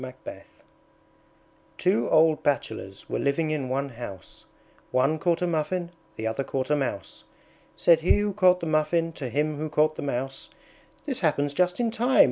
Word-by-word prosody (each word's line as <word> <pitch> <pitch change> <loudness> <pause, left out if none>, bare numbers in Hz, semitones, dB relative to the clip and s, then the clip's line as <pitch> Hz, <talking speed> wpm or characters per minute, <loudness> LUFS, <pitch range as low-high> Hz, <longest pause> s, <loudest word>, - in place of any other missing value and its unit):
Two 120 -10 +1
old 160 0 +4
Bachelors 110 -8 -2
were - - -2
living 155 +3 0
in 140 -4 -2
one 140 +2 -1
house; 115 -7 -10 0.4
One 135 +5 +1
caught 175 -2 +1
a - - +3
Muffin, 170 +1 -1 0.2
the 110 - -5
other 110 +4 -1
caught 135 +1 -3
a - - +5
Mouse. 135 -8 -4 0.5
Said 165 +9 +5
he 170 +5 +3
who 205 0 0
caught 185 -2 +4
the - - -3
Muffin 160 +1 +1
to 135 -5 -5
him 150 +4 -1
who 155 +1 -3
caught 155 +1 +2
the - - -4
Mouse, 135 0 -4 0.6
"This 270 -4 -2
happens 145 -4 +1
just 180 +5 +1
in 235 -2 +1
time! 245 +4 +1
155 Hz, 165 wpm, -26 LUFS, 135-170 Hz, 0.6 s, a